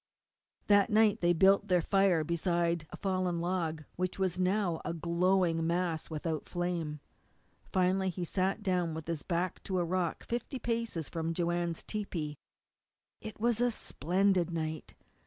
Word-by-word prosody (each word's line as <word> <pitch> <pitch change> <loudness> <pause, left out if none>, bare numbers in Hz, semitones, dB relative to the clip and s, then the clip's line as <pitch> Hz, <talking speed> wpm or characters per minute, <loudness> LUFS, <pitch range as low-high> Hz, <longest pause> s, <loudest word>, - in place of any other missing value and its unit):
That 205 0 +5
night 215 -1 +4
they 175 - +2
had 175 -1 +3
built 195 +3 +5
their 180 -1 +4
fire 195 -4 +3
beside 170 0 0
a - - -8
fallen 185 -3 0
log, 170 -3 -1
which 185 0 -2
was 185 -2 0
now 185 -2 +1
a 170 - -3
glowing 170 0 +2
mass 170 -2 -1
without 155 0 -3
flame. 175 -4 -2 0.7
Finally 190 +1 +2
he 180 0 -3
sat 190 +4 -1
down 180 -4 0
with 160 -1 -6
his 165 -3 -3
back 180 0 -2
to 190 - -1
a 175 - +1
rock 180 -1 -1
fifty 240 +3 -3
paces 230 - -2
from 165 0 -3
Joanne's 170 -1 -1
tepee. 170 -8 -4 0.9
It 220 -2 -8
was 235 0 +1
a 245 - +4
splendid 185 - +1
night. 160 -2 -4
180 Hz, 155 wpm, -31 LUFS, 165-190 Hz, 0.9 s, That